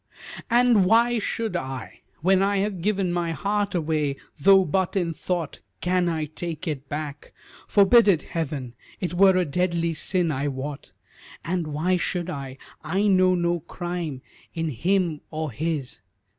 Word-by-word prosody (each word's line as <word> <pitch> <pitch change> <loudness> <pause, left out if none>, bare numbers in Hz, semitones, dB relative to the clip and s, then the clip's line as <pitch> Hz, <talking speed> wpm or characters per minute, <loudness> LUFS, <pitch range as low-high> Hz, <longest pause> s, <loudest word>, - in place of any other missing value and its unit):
"And 240 -4 +4
why 235 +2 +4
should 225 +1 -2
I? 130 -1 -5 0.2
When 190 +1 +4
I 200 +1 +2
have 195 -2 -1
given 195 -2 0
My 170 -1 -1
heart 205 +2 -1
away, 155 -4 0 0.2
though 190 +5 +6
but 185 +4 0
in 175 -4 0
thought, 170 0 -3 0.2
Can 180 -1 +1
I 160 -2 -1
take 160 +2 -6 0.2
back? 150 -1 -6 0.3
Forbid 210 +3 +6
it, 180 -6 +4
Heaven! 140 -7 -4 0.3
It 180 -3 -3
were 190 +1 +5
a 180 - +2
deadly 170 +1 0
sin, 175 +1 0
I 140 0 -1
wot. 140 +1 -5 0.5
And 170 -1 -1
why 160 +5 0
should 180 0 -2
I? 135 -3 -6 0.3
I 185 +6 0
know 185 -2 +4
no 175 0 0
crime 170 -5 -5 0.3
In 165 -1 -1
him 170 - 0
or 155 -2 -3
his." 150 -1 -3
175 Hz, 150 wpm, -25 LUFS, 155-190 Hz, 0.5 s, though